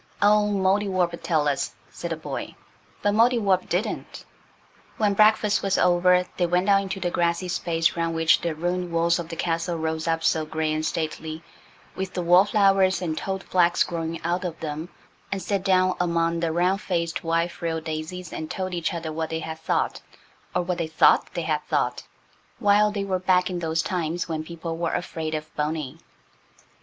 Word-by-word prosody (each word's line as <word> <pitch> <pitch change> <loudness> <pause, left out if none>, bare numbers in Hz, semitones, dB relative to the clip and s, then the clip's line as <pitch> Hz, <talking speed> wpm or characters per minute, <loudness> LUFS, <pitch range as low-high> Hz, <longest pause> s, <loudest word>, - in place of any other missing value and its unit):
"Oh, 210 0 +4
Mouldiwarp'll 190 -3 +1
tell 155 -4 +1
us," 140 -1 -1 0.2
said - - -6
the - - -1
boy. - - -6 0.5
But 205 - +2
Mouldiwarp 215 -5 +3
didn't. 180 +6 -3 0.7
When 210 -2 +2
breakfast 215 0 +4
was 195 -1 +1
over 180 0 +4
they 175 - +2
went 180 +3 +1
out 195 0 +5
into 195 0 -4
the 175 -1 -1
grassy 170 +1 0
space 170 -2 0
round 165 -1 -1
which 165 0 +4
the 170 -2 -2
ruined 175 +2 -2
walls 170 +1 +2
of 165 -1 -6
the 165 - -5
castle 165 +1 -1
rose 160 0 -2
up 165 0 0
so 160 - +2
grey 155 0 -2
and 155 0 -1
stately, 160 0 -3 0.5
with 190 -1 -4
the 180 - -1
wallflowers 195 +1 +4
and 165 -4 -2
toad 190 +3 -3
flax 175 -1 +3
growing 165 -1 -4
out 175 +2 -1
of 170 -3 -4
them, 155 +2 -5 0.4
and 195 - -1
sat 195 +1 -1
down 185 -1 +3
among 170 -1 +1
the 165 -1 0
round 180 +4 +1
faced, 170 -4 -2
white 165 +1 +1
frilled 165 -2 -3
daisies 160 +3 -5
and 155 0 -5
told 185 -1 -3
each 170 0 -1
other 160 -2 -4
what 160 0 -3
they 160 0 -3
had 160 0 -6
thought, - - -1 0.5
or 180 - +2
what 175 0 -2
they 165 - -1
thought 160 0 +4
they 170 - -1
had 155 -1 -1
thought, - - 0 0.6
while 210 -1 +4
they 205 -1 -2
were 190 -2 -1
back 180 0 +2
in 180 - -3
those 160 -1 0
times 175 -1 -2
when 160 -2 -3
people 165 0 -6
were 170 -1 -1
afraid 160 -2 -3
of 155 0 -7
Boney. 150 -2 -3
175 Hz, 185 wpm, -25 LUFS, 160-185 Hz, 0.7 s, out